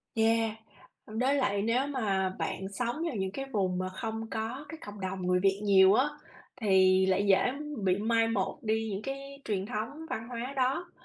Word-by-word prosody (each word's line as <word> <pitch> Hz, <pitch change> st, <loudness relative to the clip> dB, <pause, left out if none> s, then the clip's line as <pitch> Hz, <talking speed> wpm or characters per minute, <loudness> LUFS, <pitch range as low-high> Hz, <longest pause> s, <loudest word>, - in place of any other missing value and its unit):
Yeah, 225 Hz, 0 st, +2 dB, 0.5 s
đối 245 Hz, +6 st, +1 dB
lại 205 Hz, -7 st, +1 dB
nếu 240 Hz, +6 st, +1 dB
mà 200 Hz, -9 st, 0 dB
bạn 190 Hz, -, -3 dB
sống 240 Hz, +4 st, -1 dB
vào 265 Hz, -, -3 dB
những 190 Hz, -1 st, -1 dB
cái 270 Hz, +5 st, -4 dB
vùng 185 Hz, -4 st, 0 dB
mà 185 Hz, 0 st, -2 dB
không 225 Hz, +3 st, -5 dB
có 230 Hz, +6 st, -4 dB
cái 325 Hz, -, -7 dB
cộng 205 Hz, 0 st, -9 dB
đồng 185 Hz, -1 st, -3 dB
người 180 Hz, 0 st, +3 dB
Việt 195 Hz, +1 st, +2 dB
nhiều 195 Hz, -1 st, +6 dB
á, 270 Hz, +6 st, +3 dB, 0.5 s
thì 190 Hz, -2 st, +5 dB
lại 190 Hz, +2 st, +2 dB
dễ, 195 Hz, -, +7 dB
ưm, 285 Hz, -2 st, -5 dB
bị 185 Hz, 0 st, +3 dB
mai 225 Hz, +2 st, +2 dB
một 220 Hz, +2 st, -1 dB
đi 220 Hz, 0 st, 0 dB
những 195 Hz, +1 st, -3 dB
cái 275 Hz, +2 st, -7 dB
truyền 195 Hz, -2 st, -1 dB
thống 245 Hz, +8 st, -5 dB
văn 225 Hz, +1 st, -4 dB
hóa 245 Hz, +3 st, -4 dB
đó. 270 Hz, +7 st, 0 dB
220 Hz, 195 wpm, -30 LUFS, 195-255 Hz, 0.5 s, dễ